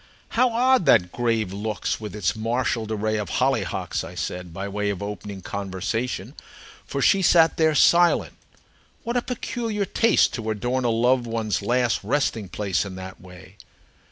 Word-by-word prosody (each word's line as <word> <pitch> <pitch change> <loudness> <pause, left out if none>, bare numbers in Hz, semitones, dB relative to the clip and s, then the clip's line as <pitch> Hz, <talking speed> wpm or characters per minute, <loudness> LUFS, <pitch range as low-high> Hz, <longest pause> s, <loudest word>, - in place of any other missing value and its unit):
"How 250 +2 +3
odd 245 - +3
that 90 -9 +5
grave 115 -5 -1
looks 105 +2 -3
with 105 -1 -6
its 100 -6 0
marshalled 115 0 -1
array 110 0 -1
of 105 - -4
hollyhocks!" - - 0
I - - -9
said, 90 -1 -5
by 95 +4 -5
way 105 +1 -2
of 100 -1 -3
opening 100 -2 -6
conversation, 100 +5 -3 0.5
for 140 - -2
she 195 - +4
sat 165 -3 +4
there 160 -1 +3
silent. 170 +4 +4 0.7
"What 235 +1 -3
a 245 - +2
peculiar 230 -4 -3
taste, 225 +4 +3
to 110 -2 -4
adorn 120 +4 -1
a - - +3
loved 120 +2 +2
one's 110 -3 -1
last 120 +2 +1
resting 115 -4 -1
place 95 -2 -1
in 100 -2 -7
that 95 0 -9
way!" 95 +1 -14
110 Hz, 160 wpm, -24 LUFS, 100-140 Hz, 0.7 s, that